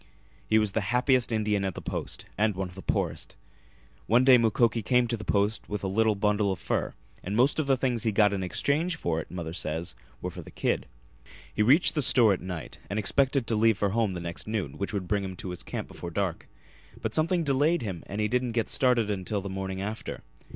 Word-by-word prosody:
He 110 - +5
was 105 -2 +2
the 110 - 0
happiest 125 +4 +2
Indian 105 -2 +1
at 95 -3 -2
the - - -5
Post, - - -5
and 105 0 +1
one 95 0 -2
of 90 - -13
the 95 - -9
poorest. - - -2 0.7
One 120 +4 +5
day 130 -2 +7
Mukoki 115 0 +2
came 125 +2 +3
to 115 - -1
the 105 - -8
Post 105 +1 0
with 105 -1 -4
a - - 0
little 110 +2 +2
bundle 105 0 +1
of 95 - -2
fur, - - -2 0.3
and 100 +3 -3
most 130 +7 +3
of 150 - 0
the 135 -1 +3
things 125 -3 0
he 110 - +1
got 105 -1 +4
in 95 - -2
exchange 145 - 0
for 85 - -1
it, - - -12
mother 85 -3 -5
says, 80 -1 -3 0.3
were - - -4
for - - -8
the - - -12
kid. - - -1 0.7
He - - 0
reached 135 +11 +5
the 150 - 0
store 120 -5 +5
at 95 - -4
night 90 -3 -7
and 100 - -2
expected 135 +4 +2
to 115 - 0
leave 110 -1 +3
for 100 - +1
home 110 -1 0
the 90 - -4
next 85 +3 -6
noon, 105 -10 -3
which 100 - -2
would 100 -4 -3
bring 100 0 0
him 95 -1 -5
to 95 0 -6
his 90 - -7
camp - - -5
before 85 - -7
dark. 90 -1 -3 0.5
But - - -3
something 170 +2 +2
delayed 145 +3 +2
him 95 -6 -4
and 100 - -5
he 105 - +2
didn't 125 +1 0
get 115 -2 0
started 125 -4 +3
until 100 +1 -2
the 100 - -6
morning 95 0 -4
after. 105 +2 -5
105 Hz, 235 wpm, -28 LUFS, 95-120 Hz, 0.7 s, day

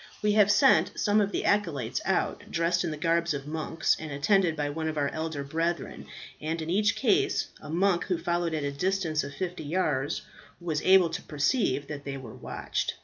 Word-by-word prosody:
We 210 - +3
have 205 -1 +5
sent 205 -5 +4
some 210 +1 +3
of 200 0 0
the - - -2
acolytes 165 - 0
out, - - -1
dressed 170 +1 +1
in 170 - -1
the 155 - -5
garbs 170 0 +1
of 140 -1 -6
monks, 160 +1 0
and 155 -2 -6
attended 165 +4 +2
by 145 -1 -2
one 160 +1 -3
of 155 -1 -3
our 140 -1 +1
elder 160 -2 -4
brethren; 165 +3 -3 0.3
and 160 +2 -2
in 160 +1 -3
each 205 +3 +2
case, 390 +8 +1
a - - -10
monk 175 +2 +1
who 180 - 0
followed 170 -1 -1
at 150 - -2
a 140 - -1
distance 165 0 0
of 140 0 -7
fifty 180 -3 -4
yards 150 -4 -1 0.4
was 165 -4 -2
able 185 -3 +5
to 165 - -4
perceive 150 - 0
that 145 -1 -7
they 140 -1 -5
were 125 -5 -9
watched. - - -3
165 Hz, 205 wpm, -28 LUFS, 150-185 Hz, 0.4 s, have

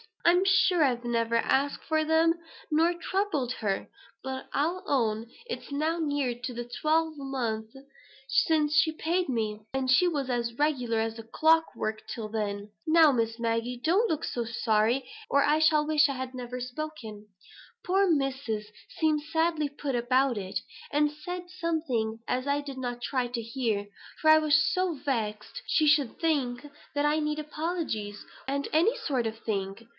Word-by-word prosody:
I'm 355 +2 +5
sure 370 -3 +4
I've 245 -3 +1
never 230 -1 0
asked 275 +4 +1
for 315 -1 +1
them, 325 +1 +4 0.4
nor 325 +3 +3
troubled 345 -7 -1
her; 200 -5 -2 0.4
but 265 0 -5
I'll 335 +6 0
own 225 -4 0 0.2
it's 475 - -6
now 310 +4 0
near 290 -4 0
on 240 0 -9
to 240 - -3 0.2
twelve 315 0 +1
months 235 -5 -3 0.5
since 300 +1 +2
she 315 - +4
paid 345 +3 0
me; 215 -4 -1
and 265 -1 0
she 355 +8 +5
was 285 -6 -1
as 235 -1 -1
regular 250 -7 +1
as 225 +1 -2
clock 325 +1 +3
work 215 0 -3
till 215 0 -5
then. 205 -1 -3 0.2
Now, 320 -1 +7
Miss 230 -2 -1
Maggie 230 +1 -1
don't 390 +9 +3
look 315 - -1
so 240 - -2
sorry, 230 +2 +1 0.2
or 280 0 +4
I 300 +1 +3
shall 310 -1 +4
wish 305 -1 +4
I 280 - -2
had 260 0 -5
never 250 0 -6
spoken. 250 -5 -6 0.6
Poor 385 +2 +3
Missus 270 -8 -1 0.3
seemed 310 -2 +2
sadly 320 -1 0
put 285 -2 -4
about, 255 +1 +2 0.5
and 295 0 +2
said 355 +4 -7
something 310 -11 -2
as 255 +2 -1
I 285 +1 +1
did 280 -2 -8
not 245 -2 -4
try 255 0 -1
to 240 -1 -3
hear; 225 -3 -2 0.3
for 315 - +4
I 310 - +9
was 305 -1 +3 0.2
so 370 -1 +1
vexed 235 - -3
she 310 - +3
should 290 -5 +3
think 280 -6 0 0.3
I 295 +1 +2
needed 300 0 -2
apologies, 300 - -3 0.2
and 280 +1 -1
them 325 +7 +4 0.2
sort 255 -6 0
of 220 0 -5
things. 195 -1 -3
275 Hz, 160 wpm, -28 LUFS, 235-315 Hz, 0.6 s, I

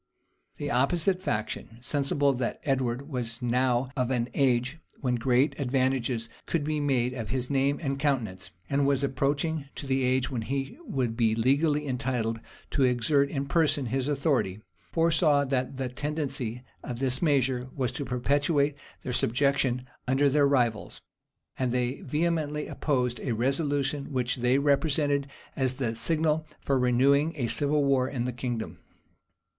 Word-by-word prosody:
[] - - -44
The 145 -1 -3
opposite 170 +9 +2
faction, 110 - -3
sensible 140 +2 +1
that 125 -2 -2
Edward 135 -1 -1
was 120 -5 -4
now 125 +1 +1
of 125 -3 0
an 125 -2 0
age 130 +2 +1 0.2
when 125 -3 0
great 125 +4 +2
advantages 130 -3 0 0.2
could 165 -3 0
be 155 0 -1
made 130 -4 +1
of 115 -4 -5
his 130 +1 -2
name 140 +1 +2
and 140 -3 -2
countenance, 115 -11 -1 0.2
and 140 0 +1
was 140 -1 +2
approaching 140 +3 0
to - - -5
the 135 0 +1
age 130 +1 +1
when 125 -3 -2
he 135 - -3
would 125 - -1
be 115 -2 +2
legally 145 +5 +2
entitled 120 -3 -1 0.3
to - - 0
exert 130 +3 +3
in 140 -1 -2
person 150 -2 +2
his 130 +3 -1
authority, 135 - 0 0.3
foresaw 160 -3 +3
that 130 -1 -1
the 135 -1 -1
tendency 135 -3 -3 0.2
of 120 - -5
this 130 0 -1
measure 130 -5 +1
was 130 -3 0
to 140 - -4
perpetuate 140 +3 +1 0.3
their 125 - -3
subjection 130 0 +1 0.2
under 135 +2 +3
their 145 0 +4
rivals; 120 -6 0 0.6
and 130 -2 +1
they 125 +1 -1
vehemently 150 0 -1
opposed 125 -5 -1
a 125 - -2
resolution 140 +3 0
which 125 -2 -1
they 125 +2 +3
represented 140 0 +2 0.3
as 130 -1 0
the 125 -4 -1
signal 155 +5 0
for 135 -2 0
renewing 140 +5 +3
a 135 -6 -1
civil 145 +4 +1
war 135 -2 +2
in 125 -4 -2
the 125 - -2
kingdom. 120 -2 -4
135 Hz, 155 wpm, -28 LUFS, 125-145 Hz, 0.6 s, their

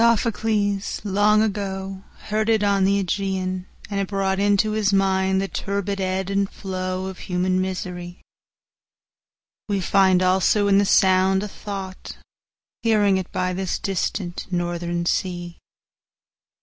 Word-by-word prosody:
Sophocles 215 -3 +1
long 210 +1 +3
agoHeard 195 +2 -4
it 220 -2 +3
on 200 -1 +3
the 200 0 +2
Ægæan, 185 -1 -2 0.2
and 200 -1 -3
it 195 - -1
broughtInto 200 +2 +1
his 210 -2 +2
mind 190 -1 +2
the 195 - -1
turbid 200 0 -3
ebb 190 +1 -1
and 195 0 +1
flowOf 185 -1 -4
human 185 0 0
misery; 180 -1 -5 1.5
weFind 190 -1 +3
also 190 +3 +3
in 200 0 +5
the 200 - +3
sound 190 0 +4
a - - -3
thought, 195 -2 -7 0.6
Hearing 210 -4 +3
it 185 -1 -4
by 185 0 -1
this 190 0 -2
distant 190 -1 -3
northern 175 -1 -2
sea. 175 -1 -2
190 Hz, 120 wpm, -23 LUFS, 185-200 Hz, 1.5 s, in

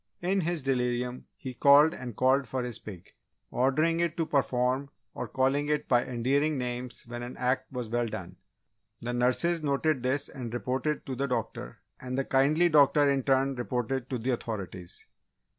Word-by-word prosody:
In 190 +2 +1
his 170 -3 -1
delirium 125 -1 -1
he 130 -3 -7
called 145 +5 +6
and 125 -3 -7
called 130 +2 +3
for 130 -1 -2
his 120 -2 -2
pig, 95 -5 -11 0.4
ordering 155 +6 +2
it 170 -1 0
to 165 - +1
perform 130 -1 0 0.2
or - - -5
calling 135 +3 +1
it 150 0 0
by 120 -1 +3
endearing 135 +5 0
names 125 0 -4
when 120 0 -7
an 120 +1 -7
act 125 +1 -1
was 125 -3 -4
well 120 +1 0
done. 95 -5 -7 0.6
The 120 +1 -3
nurses 130 +8 +2
noted 145 -1 0
this 130 +3 0
and 125 -5 -7
reported 130 +6 -2
to 130 - -4
the 140 +2 -1
doctor 125 - -4 0.2
and 125 0 -4
the 135 - 0
kindly 150 +6 +3
doctor 145 -2 +5
in 140 -1 +2
turn 135 +1 +2
reported 125 0 -3
to 130 - -2
the 120 +3 -1
authorities. 95 -7 -5
130 Hz, 175 wpm, -29 LUFS, 120-140 Hz, 0.6 s, called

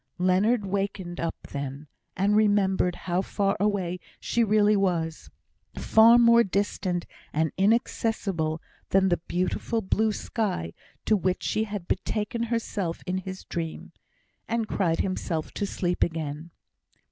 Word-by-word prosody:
Leonard 195 +5 +2
wakened 195 -2 -3
up 165 - -2 0.2
then, 140 +1 -5 0.3
and 200 +3 +2
remembered 195 -4 +3
how 180 +1 +1
far 195 0 0
away 190 -4 0 0.2
she 235 - +1
really 210 -1 +4
was 170 -5 -1 0.5
far 225 +2 +6
more 235 0 +6
distant 190 -3 -1 0.3
and 160 0 0
inaccessible 195 -6 0 0.3
than 190 0 +4
the 175 - +1
beautiful 185 +5 -1
blue 220 +2 +1
sky 200 - -2 0.3
to 215 - +4
which 185 -1 -1
she 220 - 0
had 205 -4 -6
betaken 215 +4 -1
herself 215 -7 -2
in 185 0 -1
his 190 0 -7
dream 165 -2 -5 0.6
and 225 -1 -1
cried 170 -6 +1
himself 175 -4 -2
to 205 - -3
sleep 180 -2 0
again. 160 -1 -3
190 Hz, 130 wpm, -26 LUFS, 175-210 Hz, 0.6 s, far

